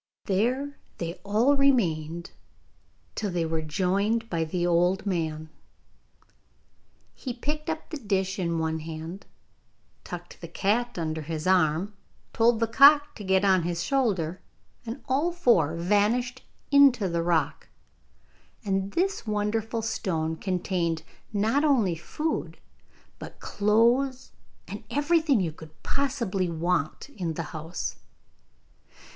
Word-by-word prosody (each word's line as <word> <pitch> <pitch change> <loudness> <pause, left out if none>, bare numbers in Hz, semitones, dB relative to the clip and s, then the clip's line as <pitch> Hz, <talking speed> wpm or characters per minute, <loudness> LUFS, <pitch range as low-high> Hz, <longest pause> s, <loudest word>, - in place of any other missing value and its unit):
There 250 +8 0 0.2
they 170 -1 -3
all 225 +8 +3
remained, 170 - +1 0.8
till 210 - -2
they 175 -2 -1
were 160 0 -1
joined 195 +8 0
by 165 -2 0
the 175 +2 -1
old 175 +3 +2
man. 160 -4 -2 1.6
He 250 -3 -6
picked 300 +5 -4
up 320 +1 -4
the 310 - -4
dish 195 -3 -1
in 170 -2 0
one 160 0 -1
hand, 160 +4 -7 0.8
tucked - - -9
the - - -6
cat 235 +4 0
under 160 -1 -2
his 155 0 -5
arm, 180 +1 +2 0.4
told 230 0 +3
the 230 - +3
cock 285 +5 +6
to 210 - -9
get 190 0 +2
on 190 -2 +4
his 170 0 -2
shoulder, 190 - 0 0.5
and 230 +5 -6
all 285 +7 +1
four 230 - +3
vanished 210 +8 +1 0.3
into 275 -7 +6
the 170 -1 -1
rock. 165 -4 0 1.0
And 195 0 -1
this 375 - 0
wonderful 220 +2 -1
stone 160 -7 -1
contained 175 -3 -1 0.3
not 220 +7 +1
only 245 - +3
food, 300 - -3 0.6
but - - -10
clothes 235 +6 +2 0.4
and - - -7
everything 295 - +2
you 170 -3 -1
could 155 0 -15
possibly 235 -10 -1
want 165 - -1
in 175 - -4
the - - -3
house. 165 +3 -4
195 Hz, 125 wpm, -27 LUFS, 170-245 Hz, 1.6 s, cock